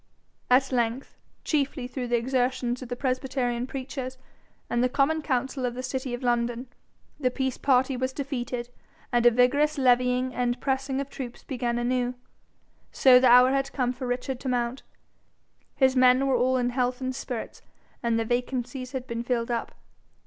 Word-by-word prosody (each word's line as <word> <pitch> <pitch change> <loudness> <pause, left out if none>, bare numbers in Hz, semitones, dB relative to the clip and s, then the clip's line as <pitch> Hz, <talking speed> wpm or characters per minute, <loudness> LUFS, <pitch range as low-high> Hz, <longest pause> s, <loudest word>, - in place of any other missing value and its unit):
At 265 +2 +4
length, 240 +1 -1 0.3
chiefly 280 -3 -1
through 250 0 -4
the 240 0 +2
exertions 250 0 -1
of 255 - -8
the 245 - -2
presbyterian 255 -2 -1
preachers 260 -1 -5 0.5
and 240 - 0
the 250 - +2
common 295 +5 +1
council 265 -2 -1
of 245 -1 -1
the 255 - -5
city 260 0 -3
of 245 - -10
London, 240 0 0 0.5
the 255 -3 +2
peace 265 0 -2
party 260 -1 +2
was 260 +1 -1
defeated, 250 -3 -4 0.4
and 240 0 +4
a - - +10
vigorous 275 +6 +2
levying 250 0 +2
and 245 0 -1
pressing 270 0 -1
of 280 0 -5
troops 250 -2 -7
began 240 -3 -2
anew. 245 +1 0 0.8
So 255 -2 +6
the 255 - +4
hour 250 +1 +7
had 275 0 0
come 250 -2 0
for 255 0 -6
Richard 250 +1 -3
to 265 - -4
mount. 245 +1 -1 0.9
His 265 -1 +3
men 255 +1 +5
were 270 -1 +2
all 255 +1 +2
in 245 -1 0
health 250 0 0
and 260 -1 -2
spirits, 245 -3 -6 0.4
and 235 -1 +1
their 225 - 0
vacancies 250 +2 -3
had 260 -1 -4
been 235 -2 -4
filled 240 0 -1
up. 235 -1 -3
255 Hz, 170 wpm, -26 LUFS, 245-265 Hz, 0.9 s, a